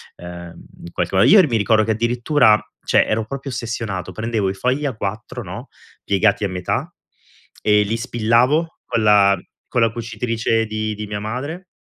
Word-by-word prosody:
Ehm, 85 -1 -10 0.2
in 85 - -9
qualche 90 +2 -1
mo - - +5
io 205 -1 +8
r 170 - +1
mi 115 - +1
ricordo 110 +1 +3
che 110 - 0
addirittura, 120 +1 +3 0.3
cioè, - - +4
ero 110 0 -1
proprio 135 +4 -6
ossessionato: 115 -6 -4
prendevo 110 -3 -1
i - - -2
fogli 125 +9 -1
A4, 110 -5 -4
no, - - -8 0.4
piegati 100 +1 +2
a 100 - -2
metà 90 -1 -2 0.7
e 105 -1 +4
li 110 +3 -2
spillavo 120 +9 +1
con 115 -2 -1
la 100 -2 +5 0.3
con 120 - 0
la 115 - +2
cucitrice 115 -1 -1
di 110 0 -3
di 105 +1 -5
mia 105 0 -4
madre. 140 - -5
110 Hz, 175 wpm, -20 LUFS, 105-120 Hz, 0.7 s, io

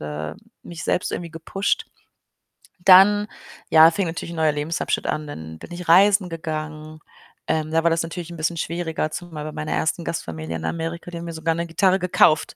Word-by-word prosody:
äh, 75 +1 -5 0.3
mich 170 -1 -8
selbst 180 - 0
irgendwie 170 -2 -4
gepusht. 175 +5 -2 0.9
Dann, 195 +3 +7 0.4
ja, 160 0 +8
fing 195 +2 -1
natürlich 170 +1 -5
'n - - -7
neuer 160 -1 +3
Lebensabschnitt 150 +3 -2
an. 155 0 -2
Dann 80 - -8
bin - - -11
ich 175 0 -7
reisen 195 +1 +5
gegangen. 155 -1 -6 0.5
Ähm, 155 0 -1
da 165 0 +2
war 170 - +4
das 165 0 +1
natürlich 170 +1 -6
'n 170 - -8
bisschen 160 +2 -1
schwieriger, 160 -1 -2
zumal 165 -3 -6
bei 155 - -5
meiner 155 0 -5
1. 165 +2 -1
Gastfamilie 80 - -5
in 80 - -5
Amerika, 165 - -4
die 170 - -6
haben 170 - -6
mir 165 - -6
sogar 160 +1 -1
'ne 170 - -2
Gitarre 190 +3 +2
gekauft. 175 -3 +3
165 Hz, 190 wpm, -22 LUFS, 155-175 Hz, 0.9 s, ja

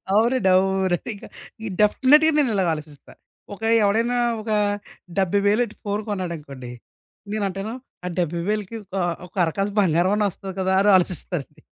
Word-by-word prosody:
అవునండి. 230 -2 +3
అవునండి. 190 +1 +1
ఇంకా 205 - -11 0.5
డెఫినిట్‍గా, 295 +9 +5
నేను 275 -5 +2
ఇలాగ 190 -2 +1
ఆలోచిస్తా. 150 -2 -10 0.4
ఒక 215 - -21 0.2
ఎవడైనా 230 +4 +2 0.2
ఒక 220 - -7 0.7
డెబ్బై 195 +1 +2
వేలేట్టి 215 +2 +1
ఫోను 205 0 -2
కొన్నాడనుకోండి. 150 -10 -5 0.6
నేనంటాను 200 +1 -3 0.3
ఆ - - -2
70,000కి 185 +6 -2 0.2
ఆహ్, 175 -1 0
ఒక 180 - -29
అరకాసు 195 +5 -2
బంగారం 175 +2 +2
అన్న 210 -1 +2
ఒస్తది 190 +3 -8
కదా! 190 0 +1
అని 205 - +5
ఆలోచిస్తానండి. 175 -4 -3
195 Hz, 135 wpm, -23 LUFS, 175-215 Hz, 0.7 s, డెఫినిట్‍గా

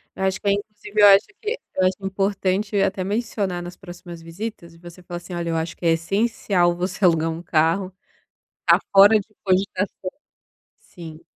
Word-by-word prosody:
Eu 190 - -4
acho 190 0 0
que - - -4
é - - +5
inclusive 210 0 -3
eu 205 - +9
acho 200 +2 +6
que 450 +3 -3 0.2
eu 185 - +2
acho 185 - 0
importante 195 +1 -1
até 195 -1 0
mencionar 200 -3 -2
nas 175 +1 -8
próximas 175 -2 -11
visitas, 170 0 -7
e 165 - -18
você 175 +1 -13
fala 175 -1 -6
assim: 175 +1 -10
"Olha, 170 -1 -3
eu 165 - -1
acho 160 +1 -4
que 175 - -7
é 165 - +5
essencial 180 0 +1
você 185 +2 -1
alugar 165 -2 +3
um 165 +1 -5
carro. 175 +3 +1 0.7
Está - - +4
fora 200 +2 +7
de 205 - -10 0.2
cogitação" 190 0 -1 0.7
Sim. 165 -3 -12
185 Hz, 185 wpm, -22 LUFS, 175-200 Hz, 0.7 s, eu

